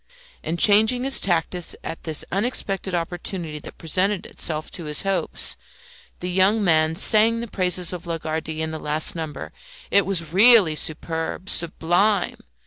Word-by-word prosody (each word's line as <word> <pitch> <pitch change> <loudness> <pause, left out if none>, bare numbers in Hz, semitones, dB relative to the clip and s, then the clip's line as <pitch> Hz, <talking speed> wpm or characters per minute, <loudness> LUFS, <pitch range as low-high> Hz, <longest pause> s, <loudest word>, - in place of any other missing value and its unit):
And 165 +2 -3
changing 220 +5 +4
his 270 0 +4
tactics 175 -1 0
at 165 - -7
this 155 -3 -3
unexpected 195 -3 -2
opportunity 170 -2 -5
that - - -12
presented 185 +4 0
itself 155 -1 -4
to 170 - -7
his 150 0 -1
hopes, 195 -1 -1 0.6
the 180 +1 -3
young 195 +4 +2
man 160 -3 +2
sang 225 +5 +4
the 235 - -5
praises 180 -3 +1
of 175 -1 -7
Lagardy 160 -1 -4
in 160 - -3
the 160 - -6
last 150 +1 -1
number. 160 -3 -6 0.4
It 200 -2 +3
was 170 -5 -2
really 210 -4 +6
superb, 160 +4 -3
sublime. 175 +4 +1
175 Hz, 145 wpm, -22 LUFS, 160-200 Hz, 0.6 s, really